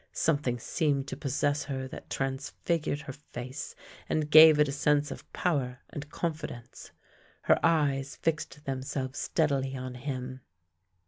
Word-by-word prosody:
Something 140 Hz, -6 st, +1 dB
seemed 140 Hz, +2 st, 0 dB
to -, -, -4 dB
possess 145 Hz, +2 st, 0 dB
her 130 Hz, -2 st, -3 dB
that -, -, -10 dB
transfigured 140 Hz, +3 st, -2 dB
her 135 Hz, -, -7 dB
face 130 Hz, -2 st, -7 dB, 0.3 s
and 155 Hz, -1 st, 0 dB
gave 155 Hz, 0 st, +10 dB
it 150 Hz, -, +5 dB
a -, -, -2 dB
sense 145 Hz, 0 st, +2 dB
of -, -, -9 dB
power 130 Hz, -8 st, -1 dB
and 145 Hz, 0 st, -6 dB
confidence. 150 Hz, -7 st, -5 dB, 0.5 s
Her -, -, +4 dB
eyes 140 Hz, -4 st, +2 dB
fixed 150 Hz, -3 st, -2 dB
themselves 130 Hz, 0 st, -3 dB
steadily 135 Hz, -4 st, 0 dB
on 130 Hz, 0 st, -5 dB
him. 130 Hz, 0 st, -5 dB
140 Hz, 135 wpm, -29 LUFS, 130-150 Hz, 0.5 s, gave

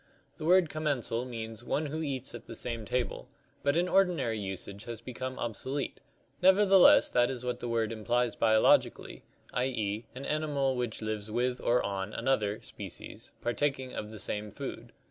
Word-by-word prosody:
The -, -, -6 dB
word 180 Hz, 0 st, +5 dB
commensal 145 Hz, -6 st, -1 dB
means 115 Hz, -2 st, -6 dB
one 150 Hz, +5 st, -1 dB
who 155 Hz, +2 st, -3 dB
eats 135 Hz, -4 st, -3 dB
at 120 Hz, -, -9 dB
the 115 Hz, -, -7 dB
same 115 Hz, -1 st, -4 dB
table, 125 Hz, +4 st, -2 dB, 0.3 s
but 140 Hz, +2 st, +2 dB
in 175 Hz, +1 st, +2 dB
ordinary 180 Hz, -, +2 dB
usage 100 Hz, +1 st, -5 dB
has 115 Hz, -2 st, -5 dB
become 130 Hz, +2 st, -5 dB
obsolete, 130 Hz, +4 st, -3 dB, 0.4 s
nevertheless 190 Hz, 0 st, +7 dB
that 120 Hz, 0 st, +4 dB
is 125 Hz, -2 st, -5 dB
what 125 Hz, -, -2 dB
the 120 Hz, -, -4 dB
word 115 Hz, -2 st, 0 dB
implies 120 Hz, +2 st, 0 dB
biologically, 110 Hz, -1 st, +3 dB, 0.3 s
i. 125 Hz, -, +1 dB
e., 110 Hz, -3 st, -2 dB
an 135 Hz, +2 st, -6 dB
animal 145 Hz, -3 st, 0 dB
which 120 Hz, -3 st, -2 dB
lives 110 Hz, -1 st, -3 dB
with 125 Hz, +3 st, 0 dB
or 120 Hz, +1 st, +2 dB
on 100 Hz, +1 st, -3 dB
another 110 Hz, -4 st, 0 dB
(species), -, -, -9 dB
partaking 130 Hz, +1 st, -1 dB
of 105 Hz, -, -4 dB
the 110 Hz, -, -8 dB
same 105 Hz, +1 st, -2 dB
food. -, -, -7 dB
125 Hz, 165 wpm, -30 LUFS, 110-140 Hz, 0.4 s, nevertheless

